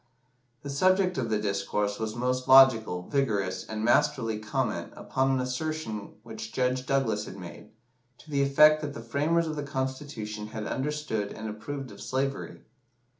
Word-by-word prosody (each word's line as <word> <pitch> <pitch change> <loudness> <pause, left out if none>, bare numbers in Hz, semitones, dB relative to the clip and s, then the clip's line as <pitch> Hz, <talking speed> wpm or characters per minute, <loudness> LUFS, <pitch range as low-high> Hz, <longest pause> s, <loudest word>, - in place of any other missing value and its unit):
The 140 - -5
subject 185 +4 +2
of 115 -3 -2
the 110 - +2
discourse 105 0 -1
was 110 0 -3
most 125 +1 -1
logical, 115 -9 +6
vigorous, 105 -10 0
and 110 0 -3
masterly 120 -4 +2
comment 110 -1 -2
upon 130 0 0
an 135 -1 +2
assertion 125 -4 -3
which 110 0 -8
Judge 130 0 0
Douglas 115 -7 +1
had 95 - -9
made, 90 +3 -10 0.5
to 155 - -15
the 140 -1 +2
effect 150 +3 +6
that 145 -2 -5
the 115 - -7
framers 150 +8 +1
of 155 -1 -3
the 150 - -3
Constitution 130 -6 -4
had 110 0 -6
understood 135 -7 -2
and 110 0 -6
approved 125 +5 -6
of 100 0 -12
slavery. 135 +3 -3
125 Hz, 160 wpm, -28 LUFS, 110-140 Hz, 0.5 s, logical